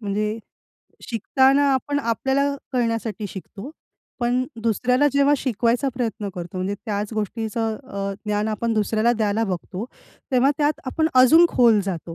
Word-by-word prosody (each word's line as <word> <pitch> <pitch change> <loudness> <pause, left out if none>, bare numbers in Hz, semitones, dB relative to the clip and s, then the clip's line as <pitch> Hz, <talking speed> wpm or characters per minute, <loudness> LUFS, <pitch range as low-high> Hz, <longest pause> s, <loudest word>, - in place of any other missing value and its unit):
म्हणजे 210 +1 -2 0.7
शिकताना 265 +5 +3
आपण 285 +2 -1
आपल्याला 270 +3 0 0.2
कळण्यासाठी 230 -4 -1
शिकतो. 200 +7 -9 0.5
पण 245 +1 +1 0.2
दुसऱ्याला 250 +5 +2
जेव्हा 280 +1 +4
शिकवायचा 245 +1 0
प्रयत्न 225 -5 -3
करतो. 175 +1 -7
म्हणजे 185 +2 -2
त्याच 210 0 -3
गोष्टीचं 220 +1 -2
अ, 200 -2 -3
ज्ञान 210 +1 0
आपण 225 +2 -1
दुसऱ्याला 220 +2 +2
द्यायला 220 0 0
बघतो. 190 +1 -4 0.5
तेव्हा 260 +2 +4
त्यात 295 0 +1
आपण 315 +5 0
अजून 290 +7 +7
खोल 230 -4 +4
जातो. 170 -3 -5
230 Hz, 135 wpm, -22 LUFS, 210-260 Hz, 0.7 s, अजून